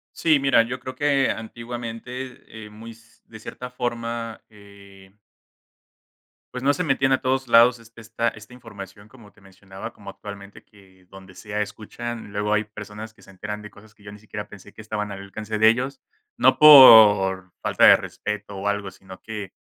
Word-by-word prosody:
Sí, 155 Hz, -3 st, +2 dB
mira, 135 Hz, -4 st, +4 dB
yo 125 Hz, +3 st, -6 dB
creo 130 Hz, -, -8 dB
que 140 Hz, -2 st, +1 dB
antiguamente, 120 Hz, +1 st, -8 dB
eh, 105 Hz, -, -14 dB
muy 110 Hz, +2 st, -12 dB
s 115 Hz, 0 st, -23 dB
de 110 Hz, -, -13 dB
cierta 125 Hz, +3 st, -9 dB
forma, 115 Hz, -2 st, -5 dB
eh 100 Hz, -2 st, -18 dB, 1.4 s
Pues, 125 Hz, +1 st, -6 dB
no 145 Hz, +1 st, +3 dB
se 180 Hz, -, -2 dB
metían 135 Hz, -3 st, +1 dB
a 130 Hz, -, +2 dB
todos 130 Hz, 0 st, -1 dB
lados 120 Hz, +1 st, +5 dB
esta 115 Hz, 0 st, -5 dB
esta 105 Hz, +2 st, -15 dB
información, 100 Hz, -4 st, -12 dB
como 110 Hz, -3 st, -18 dB
te 110 Hz, -, -25 dB
mencionaba, 95 Hz, 0 st, -11 dB
como -, -, -11 dB
actualmente 100 Hz, -1 st, -12 dB
que 95 Hz, -3 st, -23 dB
donde 95 Hz, -1 st, -15 dB
sea 105 Hz, 0 st, -4 dB
escuchan, 110 Hz, +1 st, -8 dB
luego 105 Hz, 0 st, -2 dB
hay 105 Hz, 0 st, +1 dB
personas 105 Hz, +1 st, -10 dB
que -, -, -23 dB
se -, -, -17 dB
enteran 105 Hz, +2 st, -7 dB
de 105 Hz, -, -11 dB
cosas 105 Hz, +2 st, -19 dB
que 105 Hz, -, -25 dB
yo 100 Hz, -, -11 dB
ni 105 Hz, -, -12 dB
siquiera 105 Hz, 0 st, -9 dB
pensé 105 Hz, 0 st, -15 dB
que -, -, -14 dB
estaban 105 Hz, -1 st, -5 dB
al 95 Hz, -, -8 dB
alcance 105 Hz, +2 st, -6 dB
de 110 Hz, -, +7 dB
ellos, 125 Hz, +4 st, -1 dB, 0.4 s
no -, -, +3 dB
por 105 Hz, -10 st, +8 dB
falta -, -, +1 dB
de -, -, +9 dB
respeto 105 Hz, -1 st, -7 dB
o 100 Hz, +1 st, -6 dB
algo, 100 Hz, -1 st, -2 dB
sino 95 Hz, 0 st, -15 dB
que 105 Hz, -4 st, -8 dB
110 Hz, 185 wpm, -23 LUFS, 100-120 Hz, 1.4 s, de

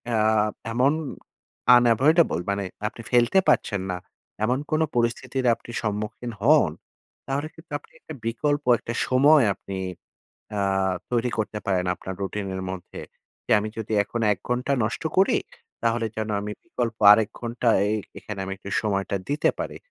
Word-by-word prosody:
আ -, -, +2 dB, 0.6 s
এমন 130 Hz, +4 st, +4 dB, 0.9 s
unavoidable 120 Hz, -, +4 dB
মানে 100 Hz, 0 st, 0 dB, 0.2 s
আপনি 115 Hz, +1 st, -8 dB
ফেলতে 120 Hz, +9 st, +4 dB
পারছেন 100 Hz, -3 st, +2 dB
না, 90 Hz, -, -2 dB, 0.5 s
এমন 125 Hz, +5 st, +2 dB
কোন 155 Hz, -, +2 dB
পরিস্থিতির 125 Hz, +2 st, 0 dB
আপনি 120 Hz, -, -12 dB
সম্মুখীন 105 Hz, +3 st, -3 dB
হন, 150 Hz, +7 st, +5 dB, 0.6 s
তাহলে 140 Hz, +3 st, -1 dB
কিন্তু 160 Hz, -1 st, -17 dB
আপনি -, -, -24 dB
একটা 160 Hz, -, -10 dB
বিকল্প 145 Hz, +6 st, 0 dB, 0.2 s
একটা 120 Hz, -, -5 dB
সময় 140 Hz, +1 st, +5 dB
আপনি 95 Hz, -, -7 dB, 0.8 s
আ -, -, 0 dB, 0.5 s
তৈরি 120 Hz, 0 st, +1 dB
করতে 105 Hz, 0 st, -2 dB
পারেন 90 Hz, -2 st, +1 dB
আপনার 95 Hz, -, -7 dB
রুটিনের 95 Hz, -1 st, -3 dB
মধ্যে। 95 Hz, -2 st, -8 dB, 0.4 s
যে -, -, -5 dB
আমি 110 Hz, -, -3 dB
যদি 110 Hz, 0 st, -4 dB
এখন 115 Hz, +3 st, -4 dB
১ 95 Hz, -, -12 dB
ঘন্টা 125 Hz, +3 st, 0 dB
নষ্ট 110 Hz, -, -2 dB
করি, 190 Hz, -, +5 dB, 0.5 s
তাহলে 115 Hz, 0 st, +1 dB
যেন 110 Hz, 0 st, -2 dB
আমি 105 Hz, +1 st, -4 dB
বিকল্প 120 Hz, -9 st, -3 dB
আরেক 105 Hz, -1 st, +5 dB
ঘন্টা 120 Hz, 0 st, -1 dB, 0.2 s
এ -, -, 0 dB, 0.3 s
এখানে 100 Hz, +1 st, -7 dB
আমি 95 Hz, -, -4 dB
একটু 100 Hz, -, -9 dB
সময়টা 100 Hz, -2 st, -1 dB
দিতে 145 Hz, +2 st, +2 dB
পারি। -, -, -4 dB
115 Hz, 150 wpm, -25 LUFS, 105-130 Hz, 0.9 s, হন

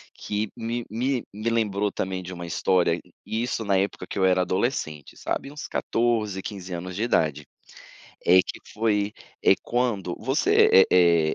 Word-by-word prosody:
que 105 Hz, 0 st, -3 dB
me 120 Hz, +1 st, -3 dB
me 125 Hz, +3 st, -1 dB
me 110 Hz, +3 st, -2 dB
lembrou 105 Hz, -3 st, 0 dB
também 95 Hz, -1 st, -3 dB
de 90 Hz, +1 st, -7 dB
uma 85 Hz, -1 st, -7 dB
história, 85 Hz, 0 st, +2 dB, 0.2 s
e 110 Hz, +1 st, -2 dB
isso 120 Hz, -2 st, -2 dB
na 100 Hz, -2 st, +2 dB
época 100 Hz, +2 st, -2 dB
que -, -, -5 dB
eu 95 Hz, -, +3 dB
era 90 Hz, 0 st, +4 dB
adolescente, 90 Hz, -, -2 dB
sabe 135 Hz, -, -3 dB
uns 150 Hz, 0 st, -7 dB
14, 110 Hz, -5 st, 0 dB
15 95 Hz, -3 st, -7 dB
anos 90 Hz, +1 st, -5 dB
de 105 Hz, -, -1 dB
idade, 75 Hz, -, +1 dB, 0.8 s
é 90 Hz, +1 st, +7 dB
que -, -, -6 dB
foi, 105 Hz, -1 st, 0 dB, 0.3 s
eh, -, -, +7 dB
quando 115 Hz, -8 st, -1 dB
você 420 Hz, -, +5 dB
é 85 Hz, -3 st, +4 dB
100 Hz, 165 wpm, -25 LUFS, 90-115 Hz, 0.8 s, é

